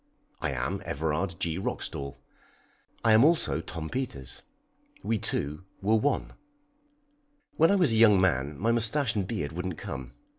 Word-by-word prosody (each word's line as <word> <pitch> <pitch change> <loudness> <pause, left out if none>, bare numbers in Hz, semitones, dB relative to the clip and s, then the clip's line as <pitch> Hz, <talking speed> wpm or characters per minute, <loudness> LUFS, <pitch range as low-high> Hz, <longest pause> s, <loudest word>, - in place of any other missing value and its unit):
I - - -1
am 70 +9 -2
Everard 80 +2 -2
G. 85 +1 -1
Roxdal. 70 -7 -4 0.9
I 110 - +6
am 110 +3 +7
also 155 - +3
Tom 80 -2 -6
Peters. 80 - -5 0.6
We 115 - 0
two 75 +1 -2 0.2
were 105 +3 +1
one. 135 +6 0 1.2
When 165 +1 +6
I 200 - +4
was 175 -10 +4
a - - +2
young 105 -4 +7
man 75 -6 +1
my 115 +5 +1
moustache 120 +2 +1
and 100 -3 -1
beard 85 -9 -3
wouldn't 90 0 -4
come. 65 -1 -6
95 Hz, 150 wpm, -28 LUFS, 75-115 Hz, 1.2 s, am